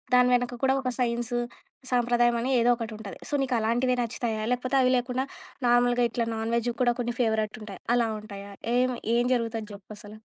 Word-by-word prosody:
దాని 250 0 +5
వెనక 245 0 -2
కూడా 265 0 +3
ఒక 255 - 0
సైన్స్ 240 0 -1 0.6
సాంప్రదాయం 240 0 +3
అనే 250 - -1
ఏదో 235 +1 +3
ఒకటి 230 -1 -5
ఉంటది. 205 -3 -8
సో - - -7
నీకలాంటివే 245 0 +1
నచ్చుతాయా? 225 -1 -2
లేకపోతే 255 +2 0
అవి 255 - +4
లేకుండా 250 +2 -1 0.4
నార్మల్‌గా 245 0 +4
ఇట్లా 235 -1 -1
నాన్‌వెజ్‌వి 230 +1 -1
కూడా 240 - +3
కొన్ని 240 0 -3
ఫేవరెట్ 220 -2 0
ఉంటాయి. 215 -1 -8 0.2
అలా 240 -1 +3
ఉంటాయా? 200 -1 -9 0.3
ఏం, 255 +1 +3 0.3
ఏం 240 - +3
జరుగుతది 230 -2 -1
జెప్పసల? 205 +1 -11
240 Hz, 170 wpm, -27 LUFS, 220-245 Hz, 0.6 s, దాని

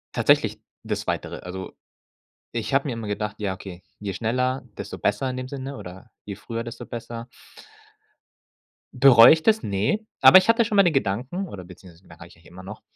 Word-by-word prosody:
Tatsächlich - - +2 0.2
das - - -3
Zweitere, - - -4
also, 95 +1 -7 0.8
ich 120 +4 -3
habe 140 +2 +1
mir 130 - -2
immer 115 -2 -6
gedacht: 105 0 -4
„Ja, 100 -3 -2
okay, 95 -2 -11 0.2
je 100 -2 -5
schneller, 125 +4 -1 0.2
desto - - -7
besser“ 105 +6 0
in 130 - -3
dem 130 0 -5
Sinne 135 0 -7
oder: 95 -1 -11
„Je 100 - -6
früher, 115 +3 -6
desto 120 -1 -8
besser.“ 115 0 -8 1.7
Bereu 125 -3 +7
ich 160 0 +4
das? 220 0 +2
Ne. 105 - -1 0.2
Aber - - +9
ich 185 - +4
hatte 230 +1 +5
schon 215 - -3
mal 200 - +6
den 175 -3 +2
Gedanken 130 - -2
oder 100 - -9
beziehungsweise 90 0 -16
merke 85 +1 -13
ich 85 - -19
eigentlich 80 0 -20
immer 90 +2 -12
noch, 95 - -10
115 Hz, 190 wpm, -23 LUFS, 95-135 Hz, 1.7 s, Aber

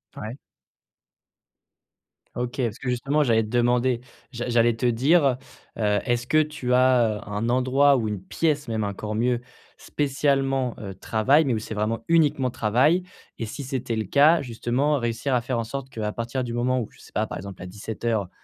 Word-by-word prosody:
Ouais. 110 +3 -6 2.0
OK, 125 +2 -3
parce 115 -3 -2
que 125 - -4
justement, 135 +5 +1
j'allais 115 -4 +3
te 105 - -7
demander, 120 +1 +2 0.3
j'a 120 -1 -4
j'allais 120 -1 +3
te 115 - -3
dire, 135 +4 +3 0.4
heu, 105 -2 +2
est-ce 120 -1 0
que 155 +3 +4
tu 150 -5 -2
as, 125 -3 +4
heu, 105 +1 -11
un 105 +3 -2
endroit 130 +3 +4
ou 115 -3 -1
une 105 -3 -3
pièce, 150 +3 -1
même 110 -1 -1
encore 105 +1 -4
mieux 120 +2 +1 0.4
spécialement, 135 -3 0
heu, 100 -2 -6
travail, 125 - +2
mais 135 -5 0
où - - -1
c'est 110 - -6
vraiment 110 +2 -2
uniquement 145 -6 +3
travail. 130 - +2 0.4
Et 115 - -2
si 140 - -6
c'était 130 -3 -3
le 110 - 0
cas, 145 - +5
justement, 125 +4 0
réussir 120 +3 -2
à 125 - +2
faire 125 +1 -2
en - - -1
sorte 135 +3 -6
qu'à 110 -4 -3
partir 120 +3 -3
du 120 -1 -4
moment 125 +2 +1
où, 115 - -3
je - - -21
sais - - -16
pas, - - 0
par - - -6
exemple 100 +1 -9
à - - -7
17:00, 105 +1 -3
120 Hz, 190 wpm, -24 LUFS, 110-135 Hz, 2.0 s, cas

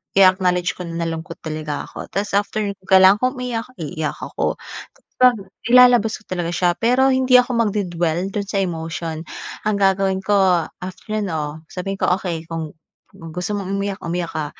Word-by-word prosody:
i-acknowledge 185 -2 +3
ko 180 - -5
na 170 0 -3
nalungkot 165 +1 -5
talaga 155 -2 -4
ako. - - -9
Ta's 200 +1 -1
after 205 +2 0 0.2
kung 190 - -25
kailangan 190 +1 +7
kong 255 +3 0
umiyak, 235 -2 -3
iiyak 160 - -4
ako. - - -2 0.6
Kapag 245 -6 +4 0.3
ilalabas 245 -3 +6
ko - - -23
talaga 175 -2 -2
siya, 175 0 +2
pero 250 +5 +3
hindi 260 -1 +5
ako 250 0 0
magde-dwell 180 -6 0
dun 205 - -1
sa 200 - -1
emotion. 165 -2 -3 0.4
Ang 215 0 +1
gagawin 195 -1 +2
ko 190 -3 +2 0.2
after, 215 +4 -5
'no, 155 -3 -4
sabihin 195 +1 -4
ko, - - +3
okey 170 -4 -4
kung 160 -2 -4 0.4
kung 165 - -10
gusto 180 +5 -3
mong 195 -2 -4
umiyak, 200 0 -2
umiyak 170 0 -3
ka. 155 -1 -2
190 Hz, 170 wpm, -20 LUFS, 165-205 Hz, 0.6 s, kailangan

